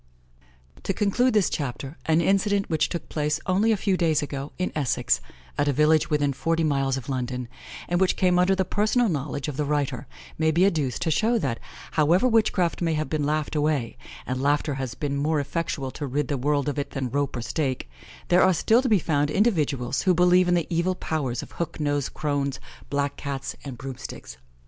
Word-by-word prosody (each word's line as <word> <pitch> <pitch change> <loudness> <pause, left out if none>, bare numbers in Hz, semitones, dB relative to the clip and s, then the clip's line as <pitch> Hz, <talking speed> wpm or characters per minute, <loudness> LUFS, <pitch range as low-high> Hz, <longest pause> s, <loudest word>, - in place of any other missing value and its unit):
To 195 - -2
conclude 220 +5 +2
this 205 -4 +4
Chapter, 140 0 -4
an 160 +1 +4
incident 195 +2 +1
which 160 - +2
took 170 - -5
place 150 0 -1
only 200 +5 +2
a 215 - +2
few 195 -1 +1
days 160 -4 +2
ago, 140 0 -5
in 185 - -1
Essex, 120 - 0 0.4
at 145 - +2
a 145 - +2
village 155 +2 +3
within 145 -2 +1
forty 165 +4 0
miles 135 -3 +1
of 130 - -7
London, 125 -2 -3 0.4
and 175 +1 0
which 190 - +3
came 180 -1 +3
under 185 +2 +4
the 190 0 0
personal 215 +5 +2
knowledge 140 -3 -3
of 145 -3 -5
the 150 - +1
writer, 145 -2 -1 0.3
may 160 0 +3
be 170 +4 +4
adduced, 150 - 0
to 160 - 0
show 225 +8 +2
that, 130 - -2 0.3
however 165 +9 +3
witchcraft 210 -8 +2
may 165 -2 +1
have 155 0 -2
been 150 -2 0
laughed 155 0 -1
away 145 -5 0 0.3
and 130 +1 -3
laughter 145 +1 +1
has 130 -2 -4
been 140 -2 -2
more 150 +2 +1
effectual 140 -2 -3
to 145 - -5
rid 140 +1 -1
the 145 - 0
world 145 +2 +1
of 145 0 -1
it 140 0 -3
than 130 -4 -4
rope 140 -1 -1
or 120 - -3
stake 130 - -2 0.4
there 180 +1 +5
are 185 -1 +5
still 225 +8 +3
to 260 - -1
be 215 - +5
found 145 -4 0
individuals 150 - +1
who 185 -2 +3
believe 180 +1 +5
in 175 - +3
the 170 -2 +1
evil 170 +2 +1
powers 140 -9 -2
of - - -12
hook 170 -1 -4
nosed 145 -2 0
crones, 140 -3 -1 0.3
black 140 0 -1
Cats, 140 -2 -4
and 135 -4 -7
broom 130 0 -7
sticks. 65 - -9
150 Hz, 205 wpm, -25 LUFS, 140-180 Hz, 0.4 s, there